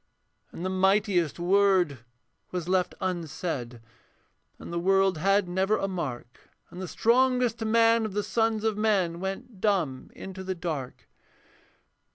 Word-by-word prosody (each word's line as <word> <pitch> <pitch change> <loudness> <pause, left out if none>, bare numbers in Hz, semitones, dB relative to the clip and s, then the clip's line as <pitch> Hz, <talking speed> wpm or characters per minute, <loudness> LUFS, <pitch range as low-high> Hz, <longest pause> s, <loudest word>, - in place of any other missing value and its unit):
And 175 - -6
the - - 0
mightiest 190 - +2
word 180 -5 +3 0.5
was 180 -2 -4
left 185 0 +1
unsaid, 155 -9 -4 0.8
And - - -9
the 170 - 0
world 195 -1 +2
had 195 +2 +2
never 190 +4 +1
a 195 - -1
mark, 135 -10 -6 0.2
And 180 - -8
the 185 - -4
strongest 245 +1 +2
man 230 +1 +4
of 215 - -5
the 210 +1 -1
sons 225 -1 0
of 220 -2 0
men 190 -6 +1
Went 190 +2 -6
dumb 170 -11 0
into 190 0 -8
the 190 0 -3
dark. 160 -7 -5
190 Hz, 140 wpm, -27 LUFS, 170-210 Hz, 0.8 s, man